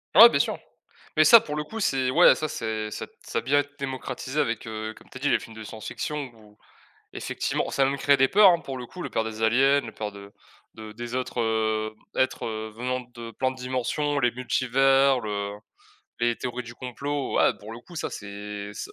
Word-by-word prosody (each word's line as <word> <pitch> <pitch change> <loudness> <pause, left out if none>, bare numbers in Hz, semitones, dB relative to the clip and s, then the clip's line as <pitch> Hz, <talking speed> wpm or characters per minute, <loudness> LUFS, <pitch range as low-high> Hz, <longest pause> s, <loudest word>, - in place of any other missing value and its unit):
Ouais, - - +11
bien - - +1
sûr - - +1 0.6
mais 155 - +7
ça, 230 +8 +9
pour 150 - -5
le 150 - -1
coup, 225 +7 -6
c'est 130 -7 +1
ouais, 170 +6 +7
ça 155 - -2
c'est 110 -5 -3
ça 110 - -5 0.2
ça - - -2
bien 140 +5 +3
été 145 0 -2
démocratisé 130 +1 -4
avec, 115 -5 -1
heu, 110 0 -5
comme - - -18
tu - - -10
as - - -12
dit 145 - +1
les - - +3
films 115 - -12
de 110 - -8
science-fiction 130 +6 -5
ou, 105 -1 -19 0.6
effectivement, - - -2
ça 135 - +2
a - - +4
même 140 +1 0
créé 140 +1 +4
des 135 0 +5
peurs, 200 +5 +7
hein. 170 - +2
Pour 135 -4 -6
le 125 - -6
coup, 180 - -10
la - - -4
peur 110 - 0
des 110 0 -6
aliens, 135 +5 +4
la 115 - -8
peur 105 -1 -4
de 100 0 -12 0.4
de 110 -1 -9
des 120 +2 -6
autres, 130 -1 -3
heu, 110 -1 0 0.2
êtres 130 - 0 0.3
venant 125 +2 -2
de 115 -1 -8
plein 130 +3 -1
de - - -10
dimensions, 130 +3 -1
les 120 -2 +2
multivers, 130 +2 +3
le 100 -2 -3 0.7
les 120 0 +2
théories 125 -1 -4
du 120 0 -10
complot, 140 +3 -4
ouais, - - +4
pour 105 +2 -10
le 115 - -9
coup, 175 +7 -14
ça 155 - -3
c'est 105 0 -7
ça - - -7
125 Hz, 220 wpm, -26 LUFS, 110-135 Hz, 0.7 s, Ouais